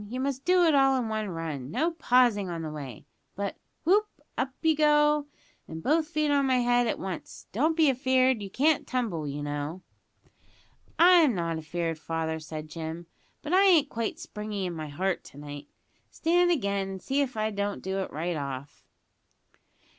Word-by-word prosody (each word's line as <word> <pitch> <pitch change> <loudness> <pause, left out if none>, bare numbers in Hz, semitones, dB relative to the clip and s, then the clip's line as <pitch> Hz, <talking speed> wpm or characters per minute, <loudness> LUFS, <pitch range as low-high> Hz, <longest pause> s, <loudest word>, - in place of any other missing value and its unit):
You 250 +3 -4
must 270 0 -2
do 360 0 +4
it 325 -2 +4
all 270 -1 +4
in 240 -3 -2
one 215 -1 -2
run; 160 -6 -5
no 310 - 0
pausing 245 - +2
on 165 -1 -4
the 155 - -4
way 140 -7 -8 0.3
but, 200 +1 -3 0.3
whoop! 410 +6 +4 0.3
up 260 - -1
you 320 -1 +4
go, 295 -1 +3 0.4
and 160 0 -8
both 310 +2 +2
feet 305 -3 0
on 280 -1 +3
my 260 -1 +3
head 245 0 +2
at - - -1
once. 185 -3 -7
Don't 310 - +1
be 320 -2 +5
afeard; 260 -2 +2
you 200 - -6
can't 295 +8 +2
tumble, 215 -12 -2
you 145 +1 -4
know." 145 +5 -4 1.1
"I'm 335 - +6
not 165 -2 -2
afeard, 165 0 -3
father," 160 0 -3
said 155 0 -7
Jim; 160 +1 -6 0.4
"but 305 +3 -3
I 375 - +6
ain't 330 -7 +5
quite 230 -1 -3
springy 210 -2 -5
in 180 - -3
my 155 -2 -5
heart 185 +6 -2
to - - -14
night. 145 0 -8 0.4
Stand 350 +2 +2
again 200 - 0
and 190 0 -6
see 275 +8 0
if 255 -5 -2
I 215 0 0
don't 200 0 -3
do 190 +1 -2
it 190 - -4
right 170 +4 -2
off." 140 -1 -6
215 Hz, 185 wpm, -28 LUFS, -, 1.1 s, I'm